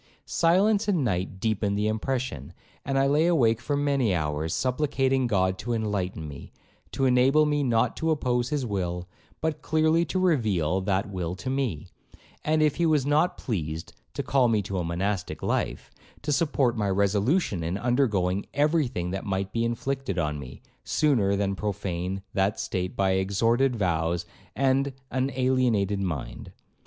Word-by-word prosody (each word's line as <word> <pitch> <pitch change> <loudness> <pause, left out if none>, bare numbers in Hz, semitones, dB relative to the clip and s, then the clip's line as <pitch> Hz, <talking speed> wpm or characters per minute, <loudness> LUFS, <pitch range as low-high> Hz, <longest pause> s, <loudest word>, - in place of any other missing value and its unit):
Silence 200 +6 +3
and 180 -8 +2
night 95 -4 -2
deepened 105 -1 0
the 105 +1 +1
impression, 110 - -3 0.3
and 135 -1 -1
I 135 - +4
lay 150 +4 +3
awake 120 -9 +3
for 145 +3 -1
many 140 -8 +1
hours, 75 0 -2
supplicating 130 - +1
God 95 -3 +1
to 120 +3 -2
enlighten 100 -7 -2
me, 70 -1 -10 0.4
to 135 - +1
enable 130 +4 +4
me 150 -1 +1
not 120 -3 +1
to 160 - -1
oppose 125 -5 0
his 145 -4 -1
will, 90 -4 -3 0.3
but 160 -1 -1
clearly 160 +1 +2
to 155 - -3
reveal 105 - +1
that 95 +1 -1
will 90 -2 -3
to 100 +8 -4
me; 130 - -2 0.6
and 155 0 +2
if 150 -2 +2
he 170 - +2
was 150 -4 +2
not 150 +5 +2
pleased 80 - -4 0.2
to - - -2
call 135 -3 +3
me 110 -3 +1
to 95 -1 -3
a - - -1
monastic 90 +3 -2
life, - - -2 0.3
to 150 - -1
support 140 -5 +2
my 105 -3 0
resolution 100 - +1
in 85 +4 -2
undergoing 105 -7 +1
every 150 +1 +3
thing 90 -8 -4
that 95 0 -3
might 95 -1 -2
be 115 - 0
inflicted 120 -3 -2
on 75 -3 -1
me, 65 -3 -10 0.2
sooner 115 -11 +2
than 100 0 0
profane 95 -2 -3
that 100 +1 +1
state 90 -1 -3
by 95 -1 +2
extorted 115 +7 +2
vows 85 -3 0 0.3
and 135 +1 +1 0.2
an 130 +1 0
alienated 125 -6 +1
mind. 85 -9 -4
115 Hz, 165 wpm, -26 LUFS, 95-135 Hz, 0.6 s, I